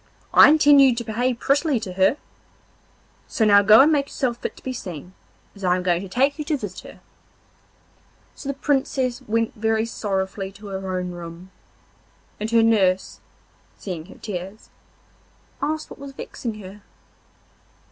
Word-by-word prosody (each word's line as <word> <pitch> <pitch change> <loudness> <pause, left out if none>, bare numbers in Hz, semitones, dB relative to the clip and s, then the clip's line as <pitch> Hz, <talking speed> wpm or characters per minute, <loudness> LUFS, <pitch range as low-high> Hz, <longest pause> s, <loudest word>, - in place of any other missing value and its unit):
'I - - +9
intend 290 -2 +6
you 265 -3 +5
to 235 - -3
behave 240 +2 -1
prettily 280 0 +1
to 190 -4 -6
her. 190 +9 +2 1.1
So 220 - 0
now 200 -1 +6
go 215 +3 +7
and 295 +3 +5
make 280 -2 +1
yourself 245 -4 -2
fit - - -6
to - - -16
be 260 - -4
seen, 180 - -8 0.4
as 200 - -13
I 180 -1 +3
am 180 - -3
going 175 -1 +1
to 195 - -8
take 270 +8 +1
you 300 - -3
to 300 -1 0
visit 205 -7 -7
her.' - - -13 1.3
So 280 - -8
the 275 - -2
Princess 265 -3 -1
went 230 -2 -1
very 220 +1 0
sorrowfully 195 -3 -3
to 205 +1 -12
her 190 -1 -4
own 180 0 -4
room, 175 +1 -10 0.9
and 215 +1 -3
her 230 0 +4
nurse, 190 -5 +2 0.6
seeing 175 -4 -7
her - - -14
tears, 195 +1 -7 0.9
asked 310 +2 -3
what - - -11
was 280 0 -9
vexing 235 -4 -6
her. 195 +2 -11
220 Hz, 165 wpm, -22 LUFS, 190-265 Hz, 1.3 s, I